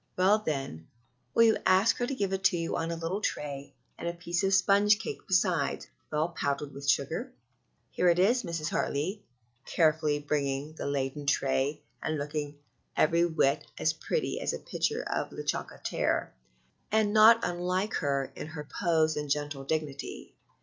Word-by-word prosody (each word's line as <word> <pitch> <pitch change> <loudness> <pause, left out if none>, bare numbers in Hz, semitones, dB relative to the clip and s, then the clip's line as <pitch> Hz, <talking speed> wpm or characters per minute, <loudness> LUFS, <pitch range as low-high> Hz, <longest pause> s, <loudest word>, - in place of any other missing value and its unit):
"Well, 195 +4 +4
then, 135 - -4 0.5
will 230 - +7
you 225 -1 +5
ask 190 +4 +4
her 245 - -1
to 275 - -2
give 200 -5 -1
it 190 0 -2
to 180 - +4
you 165 0 -2
on 165 - -2
a 170 - -2
little 165 +5 -3
tray, 140 -7 -4 0.2
and - - -4
a 170 - -1
piece 170 +1 -2
of 195 - +2
sponge 200 +2 +4
cake - - -5
besides, 185 -3 +1 0.3
well 155 +2 +1
powdered 140 -3 -3
with 140 +1 -4
sugar?" 160 - 0 0.6
"Here 180 - +2
it 170 - +3
is, 225 +7 +4
Mrs. 170 -5 -3
Hartley," 180 +9 -1 0.5
carefully 155 -2 +2
bringing 145 0 -2
the 160 - -5
laden 140 +1 -2
tray, 140 +1 +1 0.2
and 155 -1 -1
looking 145 0 -4 0.4
every 170 +2 +4
whit 150 -4 +1
as - - +1
pretty - - -2
as - - -2
the - - -2
picture - - -2
of - - -2
La - - -6
Chocolatière, - - -1 0.6
and 215 -1 +2
not 220 +1 +8
unlike 180 +3 -1
her 140 -3 -1
in - - -6
her 150 -2 -8
pose 160 -2 +3
and 150 -1 -4
gentle 145 -1 -2
dignity. 140 -2 -4
160 Hz, 170 wpm, -29 LUFS, 145-190 Hz, 0.6 s, not